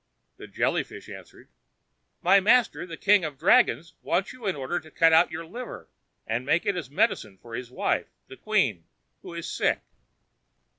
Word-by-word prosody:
The - - -10
Jelly - - 0
fish - - -12
answered: - - -13 0.8
"My 195 +3 +6
master, 220 -1 +3
the 165 -2 -8
king 205 -2 +4
of 150 -3 -4
the - - -37
dragons, 165 +2 +3
wants 195 - -1
you 245 -4 -7
in 190 - 0
order 145 +5 -2
to 155 - -16
cut 165 +1 +4
out 165 +2 +6
your 165 0 -6
liver, 240 +9 -8 0.4
and 115 +4 -3
give 170 - +2
it 205 - +1
as 160 -8 -5
medicine 110 -8 0
to 120 - -13
his 120 +1 -6
wife, 125 - -1 0.2
the - - -12
queen, 130 - 0 0.4
who 170 - -9
is 170 - -5
sick." - - 0
165 Hz, 185 wpm, -26 LUFS, 130-195 Hz, 0.8 s, My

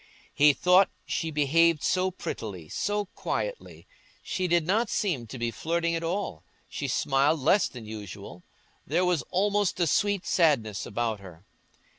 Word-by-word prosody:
He 145 0 +5
thought 180 +5 +4 0.2
she 165 - -2
behaved 155 +2 +3
so 185 0 +2
prettily, 100 - -6
so 205 +1 -1
quietly; - - -4 0.4
she 185 -1 -2
did 170 -2 +2
not 215 +5 +1
seem 155 - -1
to 130 - -8
be 120 -1 -2
flirting 170 +5 -1
at 165 0 -2
all, 165 - -3 0.2
she - - -4
smiled 145 +3 +2
less 165 +9 +3
than 120 -3 -10
usual; 105 -3 -9 0.5
there 170 +6 +1
was 180 -5 +1
almost 200 0 +1
a 175 - +3
sweet 205 +3 +1
sadness 130 - +1
about 110 0 -2
her. 90 -2 -13
165 Hz, 150 wpm, -27 LUFS, 120-185 Hz, 0.5 s, He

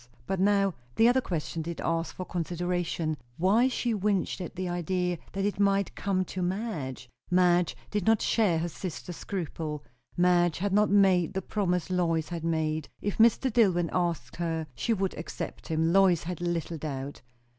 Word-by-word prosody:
But 190 +5 -2
now 195 -1 +3 0.2
the 225 - +5
other 255 +2 +4
question 165 -5 -3
did 170 +1 -5
ask 165 0 -1
for 185 - -5
consideration; 175 -2 -2 0.2
Why 205 +8 +4
she 245 -2 -1
winced 200 -2 0
at 175 - -6
the 185 0 -3
idea 175 0 -1
that 195 +1 -1
it 205 0 -1
might 200 -1 +2
come 185 -2 0
to 185 - -5
Madge? 175 - -3 0.2
Madge 180 -1 +3
did 210 -1 -1
not 225 -1 +5
share 205 -8 +2
her 165 +2 -1
sister's 175 0 -6
scruple; 160 -5 -4 0.3
Madge 175 -2 +3
had 200 +2 -1
not 210 +1 +4
made 190 -3 +4
the 190 - 0
promise 180 -4 -1
Lois 165 -3 +1
had 170 -2 -4
made; 160 -2 -1
if 205 +1 -3
Mr. 235 +2 +4
Dillwyn 180 -8 +3
asked 170 -9 -1
her, 165 -2 -2
she 175 - -2
would 195 -3 0
accept 160 - -6
him, 160 +1 +1
Lois 190 -4 +5
had 175 0 -5
little 170 -2 -2
doubt. 140 -2 -5
180 Hz, 170 wpm, -28 LUFS, 165-195 Hz, 0.3 s, the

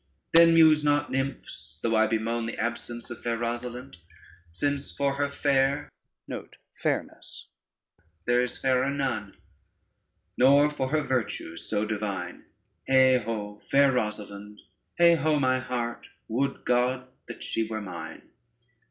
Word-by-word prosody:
Then 165 0 +7
muse 155 -2 +6
not, 145 0 +1
nymphs, 130 - -4
though 115 -1 +1
I 110 0 +4
bemoan 115 +1 -1
The 115 - -5
absence 120 0 -4
of 120 - -8
fair 115 -1 -1
Rosalynde, 120 -2 -5 0.5
Since 140 +9 -2
for 140 -1 0
her 140 0 -1
fair 140 0 +1 0.4
there - - -4 1.3
is 125 - -3
fairer 130 0 +1
none, 130 -8 -3 1.0
Nor 140 +3 +6
for 135 -3 -2
her 155 +1 +1
virtues 110 - -3
so 105 0 0
divine: 100 -5 -4 0.4
Heigh 130 -1 +6
ho, 105 -2 -5
fair 140 0 +3
Rosalynde. 105 -3 -4 0.4
Heigh 170 0 +7
ho, 155 0 +2
my 130 -1 +2
heart, 120 -2 -4 0.2
would 135 +5 -2
God 125 +1 +1 0.2
that 120 - -8
she 115 -1 -1
were 110 -1 -4
mine! 90 -5 -8
125 Hz, 125 wpm, -27 LUFS, 110-140 Hz, 1.3 s, Then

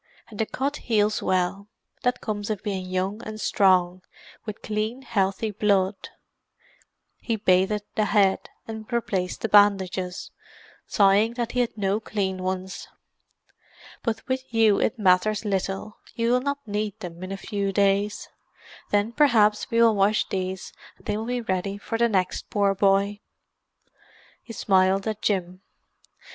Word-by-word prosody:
And 210 - -11
the 220 - +1
cut 280 +3 -2
heals 215 -2 +1
well; 185 +2 0 0.3
that 250 0 0
comes 205 -1 -4
of 210 -3 -3
being 190 -3 -3
young 185 +4 -2
and 215 0 -7
strong, 185 -3 +2 0.5
with 215 - -7
clean, 215 +5 -3
healthy 205 -2 0
blood." 195 -1 0 1.1
He 230 - -2
bathed 200 0 +2
the 215 - +1
head, 200 -2 +2 0.2
and 220 +1 -8
replaced 195 -6 -2
the - - 0
bandages, 190 -3 +2 0.6
sighing 205 +3 +3
that 240 -1 -2
he 250 - -1
had 240 -2 -1
no 200 +1 0
clean 190 -4 -3
ones. 185 0 -4 1.1
"But 225 -2 -3
with 260 -1 -3
you 225 -3 +4
it - - 0
matters 205 +2 +2
little; 195 +1 -3 0.2
you 230 0 +1
will 250 0 +3
not 280 0 -3
need 210 0 -3
them 175 -4 -8
in 185 - -6
a 195 - -4
few 200 0 -2
days. 200 +1 +1 0.6
Then 205 +2 +1
perhaps 230 -6 +3
we 230 - +1
will 225 -1 +5
wash 205 +2 +2
these 185 -1 -4 0.2
and - - -24
they 210 - -1
will 220 +2 -4
be 245 0 -1
ready 195 -2 -2
for 225 +3 -4
the 235 0 +3
next 185 -3 -1
poor 200 -2 +2
boy." 200 +1 +2 1.2
He - - -11
smiled 190 -1 +2
at 215 -1 -3
Jim. 185 -2 -1
205 Hz, 150 wpm, -25 LUFS, 190-220 Hz, 1.2 s, will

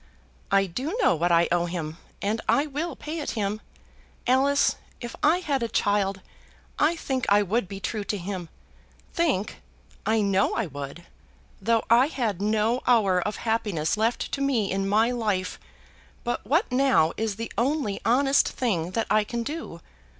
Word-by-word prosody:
"I 195 0 +4
do 265 - -4
know - - +4
what 170 +2 +1
I 170 0 +4
owe 175 0 +2
him, 165 -2 -4 0.3
and 215 +3 0
I 285 - +4
will 305 +2 -4
pay 310 +2 -5
it 295 - -3
him. 210 +1 -1 0.6
Alice, 275 +3 +3 0.2
if 240 -1 -7
I 335 +4 +4
had 280 -6 -1
a 235 - 0
child 200 -3 0 0.6
I 315 +3 +3
think 265 -6 -2
I 205 +1 +5
would 205 +2 0
be 195 +1 -7
true 210 +2 -3
to 205 - -2
him. 185 -2 -5 0.6
Think! 280 - 0 0.4
I 220 0 +2
know 195 -1 +2
I 230 - 0
would; 145 +2 -8 0.6
though 225 +3 +2
I 240 +4 +5
had 225 - -2
no 220 +3 +1
hour 200 -7 +4
of 210 +4 -2
happiness 205 -9 0
left 225 +3 0
to 275 - -2
me 245 -8 +1
in 195 +1 -1
my 220 +4 +3
life. 210 -6 -1 0.6
But 240 -4 -3
what 315 - +2
now 250 -11 +3
is 220 -2 -2
the 230 +2 -5
only 250 -4 0
honest 270 +4 +3
thing 180 -10 -1
that 225 - +1
I 215 0 +4
can 235 +2 -3
do? 310 +6 -6
220 Hz, 170 wpm, -26 LUFS, 195-260 Hz, 0.6 s, I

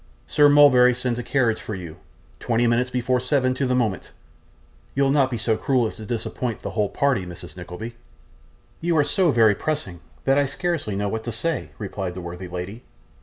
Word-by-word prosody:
Sir 145 -1 +5
Mulberry 130 -4 +6
sends 125 -1 -2
a - - -3
carriage 120 -3 +1
for 110 - -5
you 85 -4 -8 0.4
twenty 120 0 +1
minutes 120 +2 +2
before 125 0 0
seven 130 0 +1
to 130 +1 -1
the 125 - +1
moment 110 -7 -1 0.9
you'll 140 0 +3
not 135 -2 +3
be 120 - -3
so 110 0 +1
cruel 130 -1 +1
as 110 - -4
to 110 - -9
disappoint 115 0 -3
the - - -4
whole 105 -3 0
party, 140 -9 +1
Mrs. 90 -2 -9
Nickleby?' 90 +6 -7 0.9
'You 170 -1 +1
are 150 - +5
so 180 +4 +2
very 115 -5 +5
pressing, 105 - -3 0.2
that 135 +1 +3
I 140 - +2
scarcely 155 - -2
know 100 +1 -1
what 110 +2 -3
to 120 - -3
say,' 145 +9 -2
replied 95 -3 -5
the 90 - -6
worthy 90 +1 -7
lady. 90 +6 -6
120 Hz, 195 wpm, -23 LUFS, 105-135 Hz, 0.9 s, Mulberry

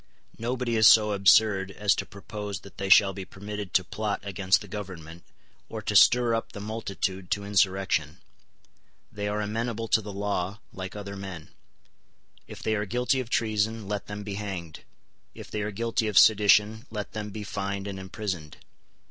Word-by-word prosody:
Nobody 120 0 -1
is 110 0 +7
so 105 -2 +7
absurd 100 0 +4
as 100 0 +2
to - - -4
propose 100 0 -7
that 100 - -14
they 100 0 -2
shall 95 0 +7
be 95 0 -6
permitted 100 0 -7
to 95 - +5
plot 105 +3 -3
against 100 -1 +1
the 105 - -9
Government, 90 -5 -8 0.5
or - - -5
to - - -2
stir 120 -1 +6
up 115 - -2
the - - -7
multitude 100 -3 -4
to 100 0 -1
insurrection. 95 -5 +1 0.9
They 105 0 -4
are 105 +1 -1
amenable 115 +2 -3
to 110 - +4
the 105 -1 -7
law, 100 -1 -2 0.2
like 95 +1 -7
other 100 -1 -6
men. 95 -5 -8 1.0
If - - -10
they 110 - +1
are 105 -1 -1
guilty 125 +5 +1
of 125 -3 -4
treason, 110 -2 0
let 105 0 -3
them 105 0 -6
be 100 -1 -5
hanged. 95 -6 -5 0.6
If - - -11
they 105 - -2
are 105 - -2
guilty 115 +2 -1
of 105 -4 -1
sedition, 105 +4 +5
let 105 -2 -5
them 105 -1 -5
be 105 +1 -6
fined 100 -1 -4
and 100 -1 -5
imprisoned. 95 -5 -5
105 Hz, 175 wpm, -27 LUFS, 95-110 Hz, 1.0 s, is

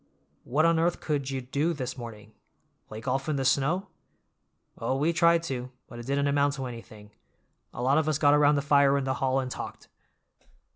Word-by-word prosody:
"What 150 +6 +2
on 165 -1 +3
earth 170 +1 +1
could 140 -3 -2
you 135 -1 -3
do 140 +7 -1
this 130 -4 -5
morning? 110 -4 -10 0.5
Play 110 +1 -8
golf 135 +4 -2
in 150 - 0
the 135 -1 -1
snow?" 155 +9 +1 0.9
"Oh, 125 +4 -1
we 155 +5 +1
tried 170 0 +4
to, 130 -5 -4 0.2
but 120 - -10
it 120 - -9
didn't 140 +1 +1
amount 140 0 +2
to 135 -1 -5
anything. 110 -4 -10 0.6
A 120 - -6
lot 135 +4 +3
of 155 0 0
us 155 - +1
got 145 -1 +4
around 150 0 +5
the 140 - 0
fire 140 -1 +4
in 140 - -1
the 130 0 -1
hall 135 0 +2
and 130 -1 -4
talked. - - -8
140 Hz, 200 wpm, -27 LUFS, 130-150 Hz, 0.9 s, around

